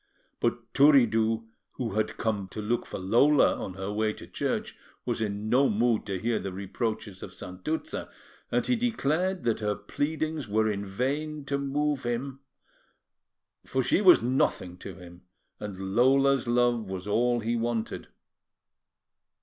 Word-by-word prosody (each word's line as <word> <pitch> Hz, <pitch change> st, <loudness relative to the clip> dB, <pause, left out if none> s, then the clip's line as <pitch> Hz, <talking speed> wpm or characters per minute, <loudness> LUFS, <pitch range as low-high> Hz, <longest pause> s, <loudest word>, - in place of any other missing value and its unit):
But 120 Hz, 0 st, -2 dB
Turiddu, 115 Hz, -6 st, +4 dB, 0.3 s
who 120 Hz, -3 st, -3 dB
had 110 Hz, +1 st, -1 dB
come 105 Hz, -4 st, -1 dB
to 95 Hz, -, -8 dB
look 115 Hz, +3 st, -1 dB
for -, -, -5 dB
Lola 120 Hz, +10 st, +4 dB
on 95 Hz, -, -6 dB
her 95 Hz, +1 st, -4 dB
way 110 Hz, 0 st, +1 dB
to -, -, -11 dB
church, -, -, -3 dB, 0.3 s
was -, -, -1 dB
in 105 Hz, 0 st, -2 dB
no 130 Hz, +5 st, +4 dB
mood 115 Hz, +1 st, +1 dB
to 95 Hz, -2 st, -2 dB
hear 115 Hz, +4 st, 0 dB
the 95 Hz, -, -4 dB
reproaches 100 Hz, +1 st, -4 dB
of 90 Hz, -, -7 dB
Santuzza; 125 Hz, -, -4 dB, 0.4 s
and -, -, +1 dB
he 250 Hz, -, +2 dB
declared 190 Hz, -, 0 dB
that 115 Hz, -2 st, +1 dB
her 105 Hz, -1 st, 0 dB
pleadings 155 Hz, +6 st, -2 dB
were 110 Hz, +1 st, +2 dB
in 100 Hz, -2 st, -1 dB
vain 140 Hz, +9 st, -2 dB
to 140 Hz, 0 st, -1 dB
move 145 Hz, 0 st, 0 dB
him, 125 Hz, +3 st, -3 dB, 1.2 s
for 130 Hz, 0 st, -1 dB
she 185 Hz, -, +2 dB
was 180 Hz, -, +7 dB
nothing 120 Hz, -7 st, 0 dB
to 95 Hz, 0 st, -8 dB
him, 90 Hz, -1 st, -13 dB, 0.4 s
and 95 Hz, -2 st, -5 dB
Lola's 135 Hz, +1 st, +4 dB
love 120 Hz, -3 st, +2 dB
was 95 Hz, +1 st, -5 dB
all 120 Hz, +3 st, +2 dB
he 115 Hz, +2 st, -1 dB
wanted. 115 Hz, -1 st, -2 dB
115 Hz, 150 wpm, -28 LUFS, 105-140 Hz, 1.2 s, was